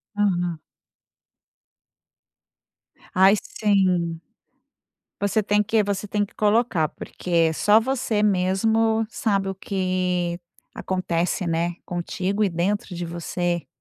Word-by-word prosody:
Uhum. 175 Hz, -5 st, 0 dB, 2.5 s
Ai 190 Hz, +2 st, +6 dB
sim. 185 Hz, -5 st, +1 dB, 1.0 s
Você 205 Hz, +2 st, +1 dB
tem 210 Hz, 0 st, +2 dB
que 220 Hz, +1 st, +2 dB
você 200 Hz, 0 st, -2 dB
tem 205 Hz, +1 st, 0 dB
que 200 Hz, -, -9 dB
colocar, 210 Hz, -7 st, +2 dB
porque 165 Hz, -1 st, -1 dB
só 205 Hz, +7 st, +4 dB
você 235 Hz, -3 st, -1 dB
mesmo 220 Hz, +3 st, +2 dB
sabe 200 Hz, -5 st, 0 dB
o 195 Hz, -, -4 dB
que 185 Hz, -2 st, -1 dB, 0.4 s
acontece, 180 Hz, -1 st, -1 dB
né, 170 Hz, +1 st, 0 dB
contigo 185 Hz, +3 st, -2 dB
e 200 Hz, -, +2 dB
dentro 185 Hz, +3 st, -1 dB
de 175 Hz, 0 st, -4 dB
você. 175 Hz, 0 st, -3 dB
190 Hz, 105 wpm, -23 LUFS, 175-210 Hz, 2.5 s, Ai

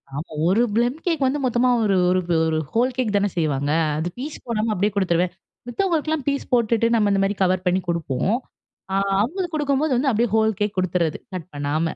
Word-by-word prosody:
ஆமா, 150 Hz, +3 st, -6 dB, 0.2 s
ஒரு 195 Hz, +6 st, +3 dB
plum 240 Hz, +4 st, +1 dB
cake 325 Hz, -6 st, +1 dB
வந்து 270 Hz, +3 st, +1 dB
மொத்தமா 250 Hz, 0 st, +2 dB
ஒரு 200 Hz, -2 st, +2 dB
ஒரு 185 Hz, +1 st, +3 dB, 0.3 s
ஒரு 160 Hz, 0 st, 0 dB
ஹோல் 250 Hz, +3 st, +2 dB
கேக் 225 Hz, -5 st, 0 dB
தானே 205 Hz, 0 st, +1 dB
செய்வாங்க. 145 Hz, -3 st, 0 dB, 0.3 s
அது 160 Hz, +3 st, -2 dB
பீஸ் 295 Hz, +4 st, -5 dB
போடாம 225 Hz, -1 st, -1 dB
அப்டியே 205 Hz, +2 st, +1 dB
குடுத்துருவேன். 180 Hz, -2 st, +1 dB, 0.3 s
மத்தவங்களுக்கெல்லாம் 315 Hz, 0 st, -1 dB
பீஸ் 280 Hz, 0 st, -1 dB
போட்டுட்டு, 230 Hz, -1 st, +3 dB
நம்ம 210 Hz, -2 st, +3 dB
இந்த 195 Hz, 0 st, +2 dB
மாரி 200 Hz, +1 st, 0 dB
கவர் 185 Hz, 0 st, +1 dB
பண்ணி 180 Hz, +1 st, +2 dB
குடுப்போம். 170 Hz, -, 0 dB, 0.6 s
அ -, -, 0 dB, 0.3 s
அவுங்களுக்கு 345 Hz, -, -2 dB
குடுக்கும்போது 290 Hz, -1 st, +1 dB
வந்து 270 Hz, +3 st, +2 dB
அப்டியே 235 Hz, +1 st, +1 dB
ஹோல் 220 Hz, 0 st, +3 dB
கேக் 210 Hz, 0 st, -1 dB
குடுத்துர்றது 175 Hz, -3 st, 0 dB, 0.2 s
கட் 180 Hz, -1 st, -6 dB
பண்ணாம. 150 Hz, +3 st, -1 dB
215 Hz, 185 wpm, -22 LUFS, 180-255 Hz, 0.6 s, ஒரு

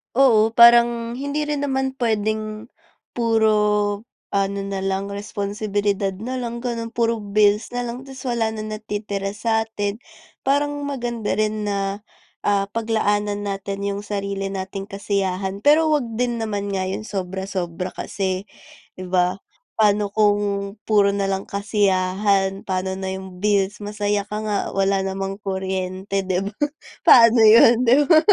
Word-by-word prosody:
Oo, 225 Hz, -4 st, +4 dB
parang, 235 Hz, 0 st, +6 dB
hindi 285 Hz, +2 st, -2 dB
rin 295 Hz, -1 st, -2 dB
naman 265 Hz, -1 st, 0 dB
puwedeng, 215 Hz, -1 st, -2 dB, 0.4 s
puro, 210 Hz, -2 st, +1 dB, 0.3 s
ano 200 Hz, 0 st, 0 dB
na 195 Hz, 0 st, -4 dB
lang, 195 Hz, +1 st, -2 dB
responsibilidad 200 Hz, -1 st, -2 dB
na 245 Hz, +7 st, -5 dB
lang, 235 Hz, -1 st, -4 dB
gano'n, 230 Hz, -2 st, -4 dB
puro 230 Hz, -1 st, +1 dB
bills 210 Hz, +2 st, +2 dB
na 245 Hz, -, 0 dB
lang, 245 Hz, +2 st, -6 dB
tas 265 Hz, -1 st, -10 dB
wala 235 Hz, -3 st, 0 dB
na 215 Hz, -, -5 dB
natitira 205 Hz, -2 st, -4 dB
sa'tin. 220 Hz, -2 st, -1 dB, 0.5 s
Parang 290 Hz, +1 st, +1 dB
maganda 240 Hz, -5 st, -2 dB
rin 215 Hz, 0 st, -1 dB
na, 200 Hz, 0 st, -2 dB, 0.5 s
ah, 200 Hz, -1 st, +1 dB
paglaanan 210 Hz, -2 st, 0 dB
natin 200 Hz, 0 st, -4 dB
yung 200 Hz, 0 st, -2 dB
sarili 200 Hz, -1 st, -3 dB
nating 195 Hz, +1 st, -5 dB
kasiyahan, 195 Hz, -1 st, -2 dB
pero 310 Hz, +2 st, +5 dB
huwag 295 Hz, -4 st, +2 dB
din 240 Hz, 0 st, 0 dB
naman 205 Hz, -2 st, -3 dB
nga, 190 Hz, -1 st, -1 dB
yung 190 Hz, +3 st, -4 dB
sobra-sobra 185 Hz, -3 st, -4 dB
kasi, 190 Hz, -1 st, -3 dB, 0.5 s
'di 185 Hz, -, -6 dB
ba? 180 Hz, +1 st, +1 dB, 0.4 s
Pa'no 210 Hz, -1 st, +3 dB
kung, 205 Hz, -1 st, +1 dB
puro 205 Hz, -2 st, +4 dB
na 200 Hz, 0 st, 0 dB
lang 195 Hz, 0 st, -2 dB
kasiyahan, 195 Hz, -1 st, +1 dB
pa'no 190 Hz, 0 st, -1 dB
na 190 Hz, 0 st, -4 dB
yung 190 Hz, -1 st, -8 dB
bills, 205 Hz, -1 st, +1 dB
masaya 205 Hz, 0 st, -1 dB
ka 210 Hz, -, -3 dB
nga, 210 Hz, -1 st, 0 dB, 0.2 s
wala 195 Hz, 0 st, +1 dB
namang 195 Hz, +1 st, -4 dB
kuryente, 190 Hz, 0 st, -2 dB
'di 185 Hz, 0 st, 0 dB
ba? 200 Hz, -, -5 dB, 0.5 s
Paano 230 Hz, -1 st, +8 dB
'yon, 230 Hz, +2 st, +7 dB
'di 240 Hz, -, +7 dB
ba? 320 Hz, -3 st, +7 dB
205 Hz, 140 wpm, -22 LUFS, 195-225 Hz, 0.5 s, Paano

